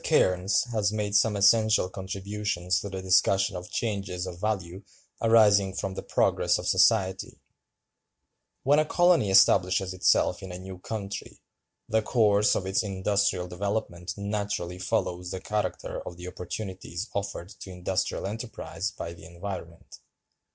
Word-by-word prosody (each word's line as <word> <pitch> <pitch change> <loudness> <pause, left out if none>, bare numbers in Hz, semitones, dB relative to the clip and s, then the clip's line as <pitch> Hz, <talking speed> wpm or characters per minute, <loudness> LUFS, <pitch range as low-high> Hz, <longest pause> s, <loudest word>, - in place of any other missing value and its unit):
Cairnes 90 +2 +3
has 105 -3 +1
made 105 -1 -2
some 105 +1 +4
essential 110 0 +4
contributions 95 -1 -2
to 100 - -6
the 95 -1 -6
discussion 95 +1 +3
of 90 0 -7
changes 100 -5 -3
of 90 -2 -7
value 95 -4 -2 0.4
arising 105 -4 +5
from 95 0 -3
the - - -5
progress - - +1
of - - -5
society:(296) 95 -4 +2 1.3
"When 145 +3 +4
a 155 - +2
colony 175 - +3
establishes 95 -1 +4
itself 90 0 +2
in 95 -2 -7
a 90 - -6
new 95 0 -9
country, 100 0 -6 0.5
the 110 0 +2
course 105 -2 +3
of 95 - -2
its 95 +1 +1
industrial 100 -2 0
development 90 -1 -3
naturally 100 -3 -3
follows 90 -4 -2
the 95 - -4
character 105 +2 -3
of 85 - -7
the 90 +1 -8
opportunities 90 +1 -6
offered 100 -3 -4
to - - -9
industrial 90 +1 -2
enterprise 105 -4 -4
by 85 -5 -7
the 85 - -14
environment. 85 -1 -8
95 Hz, 140 wpm, -27 LUFS, 90-105 Hz, 1.3 s, arising